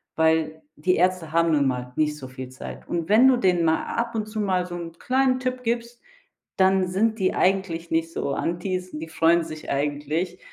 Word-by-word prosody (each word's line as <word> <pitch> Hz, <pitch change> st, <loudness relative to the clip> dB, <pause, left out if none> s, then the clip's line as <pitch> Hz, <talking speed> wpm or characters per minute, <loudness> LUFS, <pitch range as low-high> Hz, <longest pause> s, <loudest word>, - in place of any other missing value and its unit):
weil: 160 Hz, -1 st, +1 dB, 0.2 s
Die 180 Hz, +4 st, +2 dB
Ärzte 180 Hz, -3 st, +1 dB
haben 165 Hz, 0 st, +3 dB
nun 145 Hz, -3 st, +3 dB
mal 125 Hz, -1 st, -3 dB
nicht 150 Hz, -1 st, +1 dB
so 130 Hz, -3 st, -8 dB
viel 130 Hz, 0 st, -7 dB
Zeit. 130 Hz, -, -9 dB
Und 170 Hz, 0 st, -3 dB
wenn 235 Hz, +5 st, +7 dB
du 260 Hz, -, +6 dB
denen 180 Hz, -5 st, +2 dB
mal 160 Hz, 0 st, +2 dB
ab 235 Hz, 0 st, -1 dB
und 215 Hz, -1 st, -2 dB
zu 215 Hz, 0 st, -5 dB
mal 185 Hz, -3 st, +1 dB
so 175 Hz, -, -7 dB
'n 170 Hz, -1 st, -6 dB
kleinen 255 Hz, 0 st, +2 dB
Tipp 255 Hz, 0 st, -3 dB
gibst, 235 Hz, +1 st, -3 dB, 0.6 s
dann 190 Hz, -1 st, +3 dB
sind 220 Hz, +4 st, 0 dB
die 185 Hz, -, +1 dB
eigentlich 180 Hz, -3 st, 0 dB
nicht 165 Hz, 0 st, 0 dB
so 140 Hz, -, -2 dB
Antis, 180 Hz, +3 st, -2 dB
die 160 Hz, +1 st, -6 dB
freuen 165 Hz, +1 st, +3 dB
sich 155 Hz, -1 st, -8 dB
eigentlich, 150 Hz, +5 st, -2 dB
175 Hz, 200 wpm, -24 LUFS, 160-195 Hz, 0.6 s, wenn